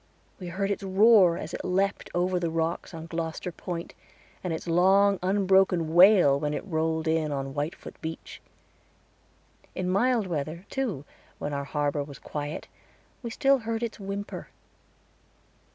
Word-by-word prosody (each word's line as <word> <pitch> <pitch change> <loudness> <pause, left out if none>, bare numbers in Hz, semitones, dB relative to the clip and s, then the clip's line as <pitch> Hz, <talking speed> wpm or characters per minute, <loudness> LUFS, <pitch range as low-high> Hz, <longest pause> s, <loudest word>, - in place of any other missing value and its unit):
We 180 - -7
heard 195 +3 -2
its 200 - -2
roar 195 -2 +5
as - - -6
it - - -5
leaped 195 +2 0
over 180 +1 +1
the 170 -1 -1
rocks 165 +1 -2
on 165 -2 -8
Gloster 165 +1 -4
Point, 170 0 -6 0.5
and 180 - -2
its 160 - -4
long, 190 +3 +4
unbroken 190 -3 +2
wail 175 -6 +7
when 150 0 -1
it - - -5
rolled 160 -2 -1
in 160 -1 +1
on 135 -1 -3
Whitefoot 150 +3 -5
Beach. 160 0 -7 1.3
In 185 - -2
mild 235 +2 +2
weather, 165 +1 -4
too, 215 - -2 0.3
when 145 - -4
our 140 0 -3
harbor 145 0 -1
was 140 -2 -10
quiet, 145 +3 -6 0.5
we 235 - -5
still 270 +4 +3
heard 225 0 -3
its 230 -1 -4
whimper. 200 +1 -5
175 Hz, 150 wpm, -27 LUFS, 160-195 Hz, 1.3 s, wail